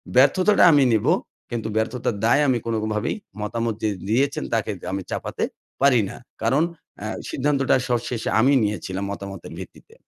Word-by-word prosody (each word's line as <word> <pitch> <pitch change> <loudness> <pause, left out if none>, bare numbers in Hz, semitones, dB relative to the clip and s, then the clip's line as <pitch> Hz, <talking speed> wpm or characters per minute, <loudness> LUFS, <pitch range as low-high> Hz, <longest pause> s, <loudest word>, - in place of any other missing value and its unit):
ব্যর্থতাটা 180 +11 +5
আমি 145 -2 +5
নিব। 110 - +1 0.5
কিন্তু 115 -2 -3
ব্যর্থতার 115 +1 -1
দায়ে 145 +6 +4
আমি 125 -2 +3
কোনভাবেই 110 -1 -1 0.3
মতামত 115 +2 -1
যে 110 - +2 0.2
দিয়েছেন, 140 +5 +1
তাকে 110 -1 0
দি - - -11
আমি 95 - -2
চাপাতে - - -3 0.4
পারি 130 -4 +5
না। - - -8 0.3
কারন 130 +7 +3 0.4
অ্যা 110 - -5 0.2
সিদ্ধান্তটা 140 -1 +2
সব 120 -1 +2
শেষে 120 -3 -2
আমি 130 +5 +5
নিয়েছিলাম 100 -2 -2
মতামতের 100 -2 -7
ভিত্তিতে। - - -12
115 Hz, 155 wpm, -23 LUFS, 110-135 Hz, 0.5 s, ব্যর্থতাটা